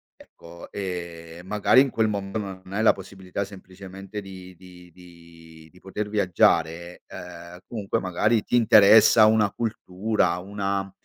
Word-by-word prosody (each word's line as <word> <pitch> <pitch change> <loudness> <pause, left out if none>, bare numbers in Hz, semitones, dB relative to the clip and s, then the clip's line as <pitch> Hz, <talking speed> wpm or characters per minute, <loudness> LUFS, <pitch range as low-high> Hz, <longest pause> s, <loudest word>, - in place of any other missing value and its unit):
ecco, 85 +1 -15
e 85 -3 -7
magari 105 +6 +3
in 135 - 0
quel 110 -1 +1
mom 100 -2 -4
non 95 -2 -6
hai 110 - -1
la 110 - +5
possibilità 95 0 -7
semplicemente 95 +1 -10
di 95 -2 -11
di 90 0 -16
di 85 -2 -17
di 90 - -20
poter 105 +3 -6
viaggiare, 85 -3 0
uhm, 90 0 -11
comunque 110 -1 -3
magari 105 +4 0
ti 125 - -3
interessa 110 0 +6
una 110 -2 +2
cultura, 105 -4 -2
una 100 0 -4
95 Hz, 135 wpm, -24 LUFS, 90-105 Hz, -, interessa